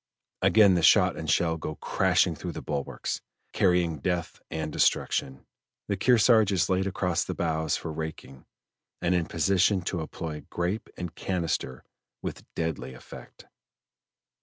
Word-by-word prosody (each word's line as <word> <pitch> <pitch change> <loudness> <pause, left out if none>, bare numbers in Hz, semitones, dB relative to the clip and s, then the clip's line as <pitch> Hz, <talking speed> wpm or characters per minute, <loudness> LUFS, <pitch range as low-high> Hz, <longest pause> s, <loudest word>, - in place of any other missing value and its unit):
Again 105 -3 +6
the 85 - +2
shot 90 +2 +5
and 80 - -5
shell 80 0 +2
go 75 -1 -5
crashing 90 +2 +2
through 85 +3 -6
the - - -6
bulwarks, 70 -2 -3 0.3
carrying 90 -4 +2
death 90 +2 -2
and 75 -1 -4
destruction; 65 0 0 0.4
the 100 - 0
Kearsarge 110 0 +4
is 90 -4 +1
laid 95 +1 +1
across 90 -2 0
the - - -5
bows 80 -1 0
for 80 - -6
raking 80 -4 -7 0.5
and 85 - +1
in 85 -2 +1
position 95 +3 +2
to 85 -1 -2
employ 80 -1 -6
grape 90 +5 -2
and 90 -2 -5
canister 80 -8 -2 0.4
with - - -7
deadly 80 -5 -3
effect. - - -13
85 Hz, 140 wpm, -27 LUFS, 80-95 Hz, 0.5 s, Again